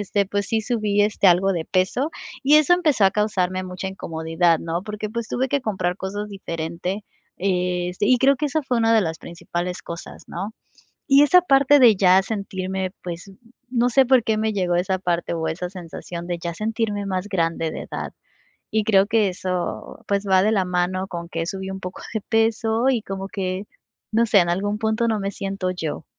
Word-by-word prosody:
este, 200 0 0
pues 200 0 -2
sí 225 +2 0
subí, 210 -3 +1
este, 210 -1 +2
algo 190 +2 +5
de 165 -3 -2
peso 195 - 0 0.3
y 285 +3 +5
eso 305 +3 +5
empezó 310 - +3
a 190 - +6
causarme 185 -3 0
mucha 180 +1 -5
incomodidad, 165 -2 0
¿no?, 165 +2 -3
porque, 210 0 -5
pues, 235 +1 -4
tuve 260 +1 -1
que 285 +1 +1
comprar 185 -7 -2
cosas 205 +2 -4
diferente, 180 +1 -4 0.3
este, 180 0 -1
y 255 - +5
creo 275 +2 +4
que 300 - -1
esa 300 +2 -1
fue 250 -3 0
una 225 0 +3
de 220 - +5
las 160 -2 -3
principales 175 +1 -5
cosas, 170 0 -9
¿no? 200 +5 -6 0.5
Y 280 0 +7
esa 360 +5 +6
parte 280 -3 +5
de 235 -6 +7
ya 185 0 +5
sentirme, 190 -2 -3
pues, 175 +2 -6 0.4
no 245 -1 +2
sé 265 +2 +4
por 255 -2 +4
qué 220 -1 0
me 220 0 0
llegó 180 -3 0
esa 185 +2 +1
parte 175 -2 -1
o 160 -1 -2
esa 180 +3 -4
sensación 175 -1 -8
de 175 -1 -2
ya 170 0 -3
sentirme 215 0 -2
más 190 0 -2
grande 165 -4 0
de - - -6
edad, - - -6 0.6
y 220 - +3
creo 195 -3 +5
que 215 -2 +2
eso, 180 -1 -4
pues, 200 0 0
va 190 -1 +5
de 215 - +3
la 195 -4 +2
mano 180 +1 -1
con 170 -2 -6
que 165 -1 -3
subí 190 +1 -5
un 190 0 -5
poco 185 -1 -7
de 220 - 0
peso 225 +2 +1
y 245 -4 +1
como 195 -1 -5
que, 190 -2 -3 0.5
no 230 +2 +3
sé, 210 -3 +5
en 175 -1 +2
algún 205 +4 -1
punto 220 +2 0
no 220 -2 +1
me 195 0 -2
siento 195 -2 -3
yo. 160 -4 -5
195 Hz, 200 wpm, -22 LUFS, 180-220 Hz, 0.6 s, Y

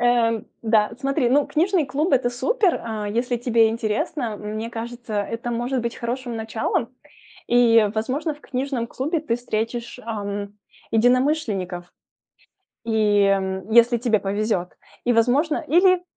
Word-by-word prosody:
Эм, 235 -2 +2 0.2
да, 220 -1 +2
смотри, 275 -2 +1
ну, 285 +2 +3
книжный 340 -1 +1
клуб- 300 +5 -1
это 250 -2 +3
супер, 405 - +1
а, 215 -2 -4
если 240 +3 -1
тебе 230 -2 +3
интересно, 225 +2 -2
мне 215 +2 -5
кажется, 235 0 -6
это 230 +3 -5
может 240 +2 -1
быть 235 0 -4
хорошим 240 0 -4
началом. 225 +2 -2 0.5
И, 230 -3 +5
возможно, 275 +8 -1
в 295 - -20
книжном 260 -3 -3
клубе 300 +7 -2
ты 265 -7 -1
встретишь, 235 +1 -4
ам, 205 -2 -5 0.3
единомышленников, 225 - +1 0.9
и, 215 -3 +3
м, 190 0 -1
если 235 +1 +5
тебе 225 -3 +2
повезет. 200 -2 -2 0.3
И, 245 - +3
возможно 275 +8 +2
или, 365 +2 +4
235 Hz, 135 wpm, -23 LUFS, 220-260 Hz, 0.9 s, И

